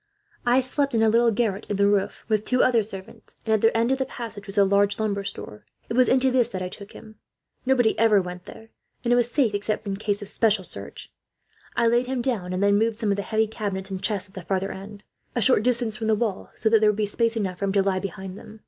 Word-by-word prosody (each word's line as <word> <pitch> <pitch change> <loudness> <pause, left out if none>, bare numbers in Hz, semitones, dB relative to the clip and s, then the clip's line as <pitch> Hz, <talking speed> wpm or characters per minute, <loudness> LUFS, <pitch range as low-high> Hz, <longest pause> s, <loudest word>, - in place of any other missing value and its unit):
"'I 250 +2 +5
slept 275 +1 -1
in 225 - +3
a 220 - +5
little 235 +2 +4
garret 215 -2 -1
in 205 - -1
the 200 +1 +3
roof, 200 -1 0
with 215 -2 +1
two 255 +2 +2
other 240 -3 +4
servants, 200 -1 -9
and 220 - +1
at 215 - +2
the 225 0 +3
end 230 +2 +2
of 265 - +1
the 265 - 0
passage 225 -4 -8
was 195 +1 -6
a 200 - +6
large 200 +1 +2
lumber 205 -2 -1
store. 105 - -8 0.3
It - - -2
was 250 +1 +4
into 260 0 +3
this 250 -2 +2
that 185 - -5
I 180 - -4
took 200 +2 -11
him. 215 0 -13 0.5
Nobody 245 -4 +3
ever 220 -2 +5
went 180 -1 -6
there, 225 - -12 0.3
and 240 0 +2
it - - +5
was 240 -1 +2
safe, 240 -4 +1
except 205 +2 -2
in 195 -1 -2
case 205 0 -2
of - - -8
special 215 -4 +1
search. 100 - -8 0.6
I - - +2
laid 240 +2 +2
him 260 -1 -2
down, 210 -9 -1
and 185 +2 -1
then 200 0 +4
moved 225 0 0
some 220 -3 0
of - - +2
the 200 - -2
heavy 220 +3 +1
cabinets 200 -3 -5
and 190 -1 -4
chests, 205 -2 -1
at 190 - -24
the 185 - -7
farther 190 +2 -2
end, 205 +2 -10 0.3
a - - +1
short 255 -2 +4
distance 235 -2 0
from 220 - -3
the 220 - +3
wall, 210 -3 -2
so 220 - -1
that 220 0 +5
there 215 - +5
would 210 - 0
be 215 - +1
space 230 +3 0
enough 185 -4 -2
for 200 - -1
him 195 - -1
to 200 -1 +3
lie 190 -1 0
behind 190 0 -7
them. 220 +1 -13
215 Hz, 270 wpm, -24 LUFS, 200-230 Hz, 0.6 s, a